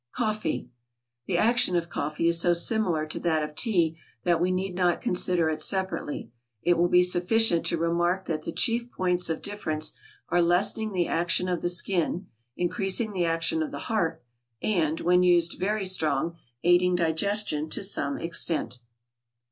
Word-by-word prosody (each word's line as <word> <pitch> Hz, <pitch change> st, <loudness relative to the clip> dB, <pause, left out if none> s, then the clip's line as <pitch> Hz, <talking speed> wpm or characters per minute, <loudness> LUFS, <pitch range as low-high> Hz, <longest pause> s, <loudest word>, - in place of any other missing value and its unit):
=Coffee.= 215 Hz, -, -2 dB, 0.6 s
The -, -, 0 dB
action 230 Hz, -5 st, +2 dB
of 170 Hz, -1 st, 0 dB
coffee 155 Hz, 0 st, -2 dB
is 170 Hz, 0 st, +3 dB
so 175 Hz, 0 st, +4 dB
similar 170 Hz, -3 st, +1 dB
to 155 Hz, -, -5 dB
that 160 Hz, -2 st, 0 dB
of 150 Hz, 0 st, -5 dB
tea 170 Hz, -5 st, +1 dB, 0.2 s
that 170 Hz, -1 st, +2 dB
we 180 Hz, -, +2 dB
need 185 Hz, 0 st, -2 dB
not 180 Hz, -1 st, +1 dB
consider 180 Hz, -2 st, +1 dB
it 155 Hz, -1 st, -2 dB
separately; 190 Hz, -9 st, -2 dB, 0.3 s
it 175 Hz, -, +3 dB
will 170 Hz, +1 st, +3 dB
be 180 Hz, 0 st, +5 dB
sufficient 180 Hz, +1 st, +2 dB
to 170 Hz, -, 0 dB
remark 175 Hz, +3 st, 0 dB
that 155 Hz, -2 st, -3 dB
the 165 Hz, -, -5 dB
chief 235 Hz, +6 st, +1 dB
points 180 Hz, -1 st, 0 dB
of 160 Hz, -, -3 dB
difference 155 Hz, -7 st, -2 dB, 0.4 s
are 175 Hz, +1 st, +3 dB
lessening 190 Hz, +5 st, +1 dB
the 180 Hz, -3 st, 0 dB
action 170 Hz, +2 st, +1 dB
of 180 Hz, -1 st, -1 dB
the 175 Hz, -, 0 dB
skin, 175 Hz, 0 st, 0 dB, 0.3 s
increasing 195 Hz, +5 st, -1 dB
the 180 Hz, -2 st, 0 dB
action 165 Hz, -, 0 dB
of 310 Hz, -, -2 dB
the -, -, -7 dB, 0.2 s
heart, 165 Hz, -6 st, -1 dB, 0.4 s
and, 165 Hz, -6 st, 0 dB
when 180 Hz, +1 st, +3 dB
used 175 Hz, -2 st, +3 dB
very 205 Hz, +1 st, -1 dB
strong, 170 Hz, -2 st, 0 dB, 0.3 s
aiding 175 Hz, +1 st, +4 dB
digestion 165 Hz, -1 st, 0 dB
to -, -, -2 dB
some 140 Hz, -8 st, 0 dB
extent. 165 Hz, -6 st, -1 dB
175 Hz, 165 wpm, -26 LUFS, 165-190 Hz, 0.6 s, be